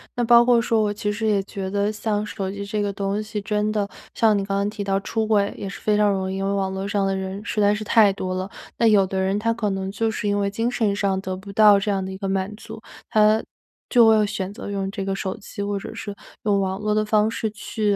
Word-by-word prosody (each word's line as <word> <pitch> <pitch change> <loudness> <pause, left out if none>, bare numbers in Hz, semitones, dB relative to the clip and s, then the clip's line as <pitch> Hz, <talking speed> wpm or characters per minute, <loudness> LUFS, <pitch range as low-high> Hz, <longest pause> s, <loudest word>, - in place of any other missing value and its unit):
那 245 - 0
包 235 0 +7
括 240 -1 +4
说 230 -1 +1
我 210 -1 0
其 205 0 -2
实 220 +2 -3
也 205 -2 +2
觉 195 -1 -5
得 205 +1 0
像 210 -1 -2
手 195 -2 -4
机 200 0 -6
这 210 +1 -2
个 205 -1 -1
东 200 +1 -2
西 215 0 -5
真 210 +1 0
的 210 -2 0 0.3
像 220 -2 +4
你 200 - -1
刚 195 0 -2
刚 200 +1 0
提 210 -1 -5
到 195 0 0
出 220 +2 -1
轨 205 -2 +2
也 195 - -5
是 - - -8
非 210 - +1
常 210 -1 +3
容 190 -1 -1
易， 190 - -3
因 195 - -2
为 195 - 0
网 190 -1 -1
络 190 +1 -3
上 200 -1 0
的 195 0 0
人 190 +1 -5
实 215 - -1
在 205 0 +4
是 215 - -4
太 215 -1 +5
多 185 -1 -4
了。 185 +1 -3 0.3
那 230 - +3
有 205 -3 +5
的 190 0 -3
人 190 +1 +1
他 230 +2 +1
可 225 -2 -1
能 195 0 -3
就 225 +3 0
是 215 -1 -3
因 205 0 +1
为 200 0 0
精 225 +4 -1
神 220 -5 0
上 195 -2 0
得 185 -1 -4
不 195 +1 -10
到 210 -1 +7
这 205 +1 -1
样 195 -1 -1
的 190 - -5
一 190 - -6
个 195 0 -4
满 195 +2 -2
足， 220 - -10 0.3
他 215 +1 +4 0.5
就 235 -3 +6
会 215 -1 +5
选 200 -2 -4
择 205 - -7
用 195 -1 -2
这 195 -1 -4
个 195 0 -1
手 190 -1 -4
机， 205 - -8
或 200 0 -1
者 195 - -7
是 205 -1 -6 0.3
用 205 -2 +2
网 190 0 -1
络 210 0 0
的 215 - +2
方 215 0 +3
式 225 -1 -2
去 210 0 -1
205 Hz, 300 characters per minute, -23 LUFS, 195-215 Hz, 0.5 s, 包